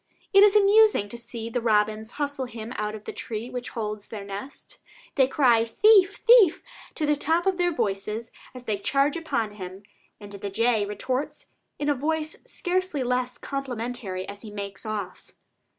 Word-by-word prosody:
It 395 - +8
is 415 0 +6
amusing 415 - +5
to 235 - -6
see 230 -1 -7
the 245 - -1
robins 215 0 +1
hustle 285 -2 -2
him 230 -2 -8
out 210 0 -3
of 215 - -11
the - - -5
tree 230 +2 -5
which 250 -1 -5
holds 210 -2 -4
their 210 -3 -7
nest. 200 +8 -9 0.3
They 265 -3 +4
cry 250 -5 +4
"Thief, 400 - +5
thief!" 460 -8 +5 0.3
to 310 - -1
the 295 0 +3
top 325 +5 0
of 385 -1 +1
their 350 0 +2
voices 215 - -2 0.2
as 250 - -9
they 210 -4 -2
charge 275 +6 +1
upon 235 -10 -2
him, 190 +1 -8 0.4
and 205 -1 -11
the 200 0 -5
jay 220 0 +1
retorts 260 +8 -4 0.3
in 290 - -3
a 290 - +4
voice 310 +3 -2
scarcely 370 - -1
less 250 0 -1
complimentary 245 -8 -4
as 200 0 -8
he 220 - -9
makes 200 +1 -7
off. 205 -4 -6
245 Hz, 175 wpm, -25 LUFS, 210-300 Hz, 0.4 s, It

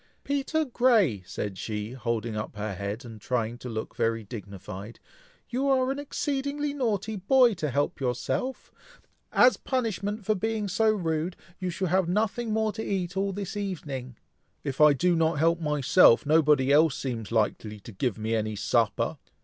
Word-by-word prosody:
"Peter 285 +3 0
Grey!" 230 - +3
said 100 -3 -5
she, 105 0 -4
holding 115 -3 -2
up 105 0 -5
her 105 -1 -3
head, 100 +6 -5
and 110 -3 -10
trying 115 -1 -1
to 125 - -7
look 110 -1 -5
very 115 0 0
dignified, 100 0 -8 0.5
"you 265 +3 -1
are 260 -1 +3
an 275 - -3
exceedingly 285 0 -2
naughty 220 -6 -1
boy, 240 +5 +4
to 155 -6 -2
help 145 +3 -1
yourself! 130 - -2 0.6
As - - +5
a - - -33
punishment 215 -5 -2
for 215 - +3
being 215 +1 -2
so 220 +4 +2
rude, 170 -4 -1 0.2
you 185 - -2
shall 180 +1 -2
have 185 -1 +2
nothing 220 +4 0
more 220 0 +1
to 220 +1 -5
eat 185 -2 -2
all 195 +1 0
this 200 +1 -5
evening." 145 - -4 0.5
"If 140 0 -3
I 150 -1 +8
do 175 +6 +2
not 165 0 +2
help 165 +3 +3
myself, 150 -5 +5
nobody 150 -3 +4
else 150 0 +4
seems 115 -5 -4
likely 105 -1 -1
to 115 - -10
give 115 +3 -2
me 110 +1 -2
any 110 -1 -1
supper! - - 0
160 Hz, 170 wpm, -27 LUFS, -, 0.6 s, I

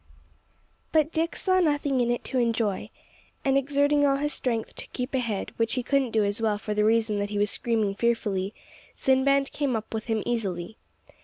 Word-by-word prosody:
But 310 -1 +3
Dick 330 +1 0
saw 370 -1 +2
nothing 290 -5 +1
in 240 - +1
it 240 - -1
to 260 - -1
enjoy. 230 -4 0 0.6
And 270 0 +3
exerting 285 +1 +2
all 275 -1 +4
his 295 +1 -1
strength 230 -5 -2
to - - -7
keep 250 +2 -5
ahead, 235 -6 -2
which 230 +1 +1
he 250 - -1
couldn't 275 0 +1
do 220 -1 +2
as 205 +2 -1
well 215 -2 +1
for 210 0 -4
the 210 0 +1
reason 220 -1 +2
that 205 0 -2
he 205 - -3
was 205 0 +2
screaming 220 -4 0
fearfully, 205 -4 0 0.4
Sinbad 275 +1 +2
came 280 -5 -1
up 220 0 -5
with 220 +1 -4
him 220 -2 0
easily. 200 -4 -3
235 Hz, 190 wpm, -26 LUFS, 215-275 Hz, 0.6 s, all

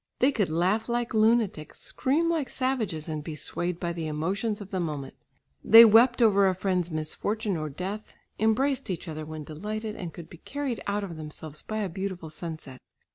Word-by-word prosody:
They 260 +3 +4
could 205 - 0
laugh 185 +8 +1
like 240 -1 -1
lunatics, 215 -8 +2
scream 300 +6 0
like 325 -5 0
savages, 225 - -1
and 155 -2 -4
be 155 0 -6
swayed 175 +3 -2
by 170 -1 -2
the 165 -2 -4
emotions 195 +8 -1
of 200 -2 -9
the 190 - -1
moment. 150 -5 -3 0.5
They 225 +2 +10
wept 235 +3 +6
over 200 -3 +5
a 185 - +1
friend's 180 -2 0
misfortune 195 +7 -2
or 155 -1 -3
death, 190 +8 -6 0.2
embraced 250 +5 +1
each 180 -1 -4
other 155 -1 -5
when 155 -1 -6
delighted 210 +8 -5
and 180 -6 -6
could 165 0 -10
be 170 - -13
carried 280 -4 -4
out 205 0 0
of 170 -5 -6
themselves 155 0 -8
by 215 0 -3
a - - -1
beautiful 185 -2 -5
sunset. 155 -6 -7
190 Hz, 185 wpm, -27 LUFS, 160-220 Hz, 0.5 s, They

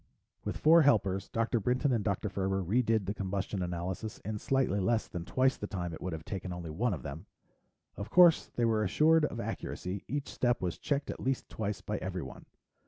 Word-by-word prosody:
With - - -3
four 165 +2 +6
helpers, 100 -9 +2
Dr. 115 +1 0
Brinton 125 +6 +1
and 115 -4 +1
Dr. 100 0 -1
Ferber 95 0 -1
redid 110 +2 +2
the 100 - -2
combustion 100 -1 -3
analysis 90 +4 -4
in 105 0 -3
slightly 130 -7 +1
less 110 +4 +1
than 90 -3 -6
twice 130 +5 +2
the 105 - -5
time 90 -4 -4
it - - -8
would 90 - -3
have 80 -2 -6
taken 95 -1 -5
only 85 -2 -5
one 100 +6 0
of 70 - -10
them. 80 +8 -7 0.7
Of 100 - -5
course 175 -2 +6
they 120 - +2
were 110 -2 +2
assured 155 - +4
of - - -4
accuracy; 95 +2 -4
each 145 +1 -3
step 120 -1 +1
was 90 -2 -3
checked 145 -1 -1
at - - -8
least 130 0 -2
twice 105 -2 -3
by - - -3
everyone. - - -6
105 Hz, 200 wpm, -31 LUFS, 95-125 Hz, 0.7 s, four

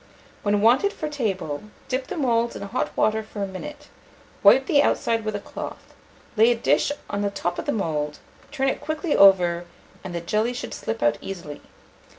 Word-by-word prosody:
When 205 0 +1
wanted 255 - +4
for 310 - -4
table, 195 - -2 0.3
dip 260 +1 -2
the - - -5
moulds 235 -5 +1
in - - -6
hot 200 - -2
water 220 0 +2
for 215 -1 -6
a - - -2
minute, 295 +10 -8 0.5
wipe 265 - +7
the 285 +1 +4
outside 230 -5 +1
with 215 -1 -2
a - - -2
cloth, - - -8 0.4
lay 225 +2 +6
a 240 - +3
dish 230 - +2 0.2
on 205 - -2
the 205 - +1
top 175 -3 -3
of - - -4
the - - +2
mould, 150 - -2 0.3
turn 270 -2 -1
it 270 - -1
quickly 310 +2 -1
over, 175 -3 +5 0.4
and 185 -2 -6
the - - -1
jelly 215 +7 0
should 245 - -6
slip 225 0 -4
out 150 0 +2
easily. 170 -6 -7
215 Hz, 190 wpm, -24 LUFS, 190-265 Hz, 0.5 s, wipe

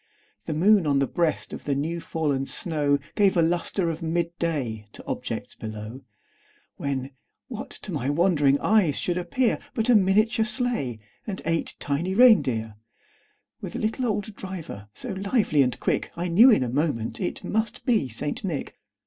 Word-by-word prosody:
The 155 - -2
moon, 190 +1 +4
on 140 -1 +3
the 140 - +3
breast 165 +2 -1
of - - -8
the 140 - 0
new 160 +5 -2
fallen 145 -5 -1
snow, 145 -4 +1 0.2
Gave 195 -3 +3
a 170 - +5
lustre 170 +1 0
of 160 +2 -7
mid 170 +1 -1
day 125 -11 -2
to - - -9
objects - - -4
below; 110 +3 -7 0.8
When, 135 -1 -3 0.4
what - - -6
to - - -9
my 130 - -2
wondering 145 -3 +3
eyes 195 -9 +3
should 175 0 -1
appear, 225 +8 0 0.2
But 225 0 0
a 245 - +7
miniature 215 +4 +3
sleigh, 235 - -1 0.3
and 195 -3 -4
eight 165 0 -1
tiny 165 +7 -1
rein 240 -1 +8
deer, 110 -4 -3 0.8
With - - -6
a - - -2
little 225 +4 -1
old 210 -1 -2
driver, 165 - -7
so 255 - -7
lively 195 - +2
and 125 -2 0
quick, - - -1
I 175 +1 -2
knew 220 +10 +7
in 215 - +5
a - - -2
moment 130 - -1
it 180 - -3
must 220 +1 -2
be 225 - +2
St. 145 +6 -4
Nick. 170 -8 -4
170 Hz, 175 wpm, -25 LUFS, 140-200 Hz, 0.8 s, rein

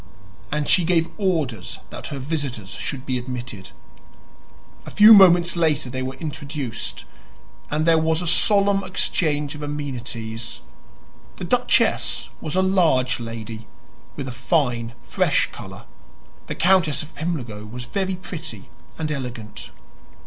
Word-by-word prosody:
And 150 0 -1
she 185 -1 +4
gave 165 -1 +2
orders 155 - -1
that - - -7
her 140 - -5
visitors 135 - -3
should 135 -2 -4
be 130 -1 -1
admitted. 120 -5 -6 1.1
A - - -9
few 215 +1 +9
moments 175 -4 +7
later 155 -6 +1
they 130 0 -3
were 130 +1 -4
introduced, 145 -5 -5 0.6
and 155 +1 0
there 165 -1 +5
was 160 0 +1
a 180 - -3
solemn 200 +2 +3
exchange 150 -5 0
of 150 - -8
amenities. 120 -6 -4 0.7
The - - -8
duchess - - +1
was 155 0 -4
a 185 - +3
large 165 -11 +3
lady, 115 -1 -7 0.5
with 135 - -5
a - - -4
fine 120 -2 0
fresh - - +1
color; - - -10 0.6
the - - -4
Countess 170 -5 +3
of 155 - -13
Pimlico 125 -11 -4
was 120 +3 -7
very 190 +7 -1
pretty 160 - -7 0.3
and 155 -1 -2
elegant. 125 -6 -6
145 Hz, 135 wpm, -23 LUFS, 120-170 Hz, 1.1 s, few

